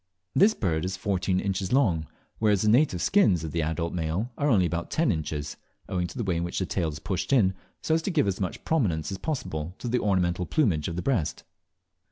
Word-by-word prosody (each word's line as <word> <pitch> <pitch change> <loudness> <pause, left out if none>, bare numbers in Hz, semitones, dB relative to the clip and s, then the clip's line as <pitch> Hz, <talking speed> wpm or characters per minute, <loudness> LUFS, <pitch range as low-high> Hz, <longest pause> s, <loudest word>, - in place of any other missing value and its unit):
This 215 +3 +5
bird 80 -5 -1
is 95 +1 -3
fourteen 95 -1 0
inches 95 -1 -2
long, 90 - +2 0.3
whereas 105 -3 +3
the 105 - +3
native 115 - +3
skins 105 - +3
of 80 - -4
the 85 - -1
adult 80 +2 -2
male 90 +8 -2
are 145 - 0
only 100 -8 +4
about 85 0 -2
ten 160 -6 +2
inches, 75 -3 -3 0.3
owing 90 -1 -1
to 85 - -10
the 120 - -1
way 90 -4 0
in 85 - -1
which 85 - -4
the 95 - 0
tail 85 -3 -1
is 75 - -6
pushed 95 - -3
in, 105 -9 +4 0.3
so 160 - +1
as 160 - +2
to 160 - -2
give 165 - +2
as 95 0 -1
much 90 - -3
prominence 90 - 0
as 95 - -5
possible 90 - -4
to - - -6
the 125 +1 +1
ornamental 90 -3 +1
plumage 95 - +1
of 85 - -4
the 90 - -3
breast. 90 - -1
95 Hz, 230 wpm, -27 LUFS, 85-115 Hz, 0.3 s, This